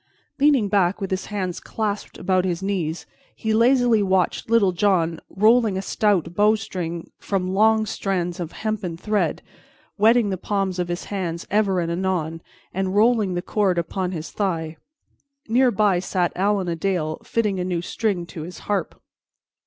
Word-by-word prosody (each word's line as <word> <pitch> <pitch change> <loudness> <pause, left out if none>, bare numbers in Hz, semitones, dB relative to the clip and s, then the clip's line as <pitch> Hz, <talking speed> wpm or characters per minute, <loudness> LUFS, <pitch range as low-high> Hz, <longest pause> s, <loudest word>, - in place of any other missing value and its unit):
Leaning 275 -7 +4
back 195 -2 +2
with 195 -2 -4
his 190 +1 -2
hands 185 -4 -3
clasped 210 -2 -4
about 185 0 +1
his 180 0 -2
knees, 180 -5 -2 0.3
he 220 -1 -1
lazily 240 -1 +4
watched 190 +1 0
Little 225 -5 +4
John 175 -3 +1
rolling 220 0 +3
a - - -1
stout 195 -6 +1
bowstring 195 -5 0
from 185 -2 -2
long 220 +2 +4
strands 185 -3 -2
of 170 -2 -4
hempen 215 -6 -3
thread, 210 +3 -1 0.6
wetting 220 0 +4
the 190 - -3
palms 195 -2 -1
of 175 - 0
his 175 0 -3
hands 170 -3 -3
ever 200 -3 +2
and 170 -1 -1
anon, 170 -3 -2 0.3
and 190 +1 -1
rolling 215 -3 +3
the 175 - -2
cord 195 -4 +1
upon 180 +2 -2
his 160 -3 -6
thigh. 165 -6 -2 0.7
Near 250 +3 +4
by 205 -5 +2
sat 180 -1 -1
Allan 195 0 +1
a 170 - -1
Dale 165 -3 -2
fitting 210 -5 0
a - - -1
new 175 -2 -2
string 195 -3 -1
to 170 -1 -8
his 170 +3 -8
harp. 200 -5 -2
190 Hz, 160 wpm, -23 LUFS, 175-210 Hz, 0.7 s, Leaning